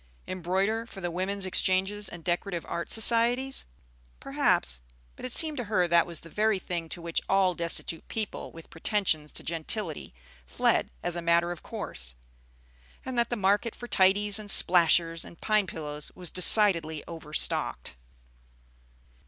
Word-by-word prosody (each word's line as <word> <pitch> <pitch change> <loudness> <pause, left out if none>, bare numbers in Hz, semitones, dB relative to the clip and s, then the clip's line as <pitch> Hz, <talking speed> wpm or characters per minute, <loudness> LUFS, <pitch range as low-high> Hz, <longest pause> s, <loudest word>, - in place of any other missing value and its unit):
Embroider 190 +5 -2
for 195 - -11
the 175 -2 -4
Women's 190 +3 -1
Exchanges 190 +2 0
and 170 -1 -10
Decorative 175 0 -3
Art 170 - -5
Societies? 240 +4 +4 0.5
Perhaps; 60 0 +1 0.3
but - - -9
it 255 - -4
seemed 310 +3 +5
to 245 - -3
her 185 -4 +1
that 170 0 +3
was 170 -1 -2
the - - -12
very 215 -1 +1
thing 175 -3 -5
to 175 - -5
which 170 -1 -2
all 190 -1 +3
destitute 170 -1 -2
people 220 -3 -5
with 165 -1 -14
pretensions 165 -4 -1
to - - -3
gentility 165 +1 -3 0.3
fled 60 +1 0
as 175 - -1
a 175 - -4
matter 170 +1 +2
of 175 - -7
course, - - -4 0.9
and 260 - -5
that 235 -1 +1
the 240 - -1
market 205 +2 0
for 240 - -9
tidies 200 +1 +3
and 210 -1 -7
"splashers" 170 -2 +3
and 170 - -14
pine 215 -3 +1
pillows 150 -3 -5
was 180 -2 -5
decidedly 170 -5 +4
overstocked. 155 - -1
185 Hz, 155 wpm, -27 LUFS, 165-210 Hz, 0.9 s, seemed